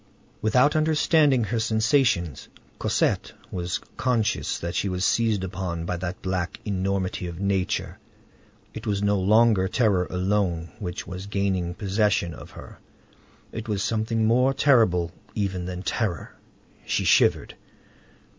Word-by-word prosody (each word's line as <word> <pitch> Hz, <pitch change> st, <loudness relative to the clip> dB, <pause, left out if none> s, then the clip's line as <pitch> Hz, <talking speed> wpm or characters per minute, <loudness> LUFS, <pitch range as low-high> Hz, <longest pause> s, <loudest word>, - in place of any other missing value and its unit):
Without 125 Hz, +7 st, +3 dB
understanding 155 Hz, -4 st, +3 dB
her 110 Hz, +2 st, -1 dB
sensations, 110 Hz, -, +1 dB, 0.3 s
Cosette -, -, 0 dB, 0.2 s
was 90 Hz, -1 st, -2 dB, 0.2 s
conscious 115 Hz, -3 st, 0 dB
that 85 Hz, 0 st, -4 dB
she 100 Hz, -, -1 dB
was 90 Hz, 0 st, -1 dB
seized 110 Hz, -4 st, +1 dB
upon 90 Hz, -2 st, -4 dB
by 90 Hz, -, -2 dB
that 85 Hz, +1 st, -5 dB
black 90 Hz, -1 st, -2 dB
enormity 95 Hz, -2 st, -2 dB
of 85 Hz, 0 st, -7 dB
nature; 100 Hz, -2 st, -1 dB, 0.7 s
it -, -, -7 dB
was 100 Hz, -1 st, 0 dB
no 100 Hz, -1 st, +2 dB
longer 105 Hz, 0 st, +4 dB
terror 100 Hz, -5 st, +1 dB
alone 90 Hz, -3 st, -1 dB
which 90 Hz, -5 st, -5 dB
was 95 Hz, +1 st, -7 dB
gaining 95 Hz, -3 st, -1 dB
possession 100 Hz, -3 st, 0 dB
of -, -, -11 dB
her; -, -, -12 dB, 0.7 s
it 115 Hz, +1 st, -6 dB
was 105 Hz, -1 st, -1 dB
something 110 Hz, 0 st, 0 dB
more 125 Hz, +4 st, +3 dB
terrible 90 Hz, -, +3 dB, 0.2 s
even 95 Hz, -4 st, -2 dB
than 90 Hz, 0 st, -5 dB
terror; 100 Hz, -, -2 dB, 0.5 s
she -, -, -1 dB
shivered. -, -, +3 dB
100 Hz, 130 wpm, -25 LUFS, 90-110 Hz, 0.7 s, longer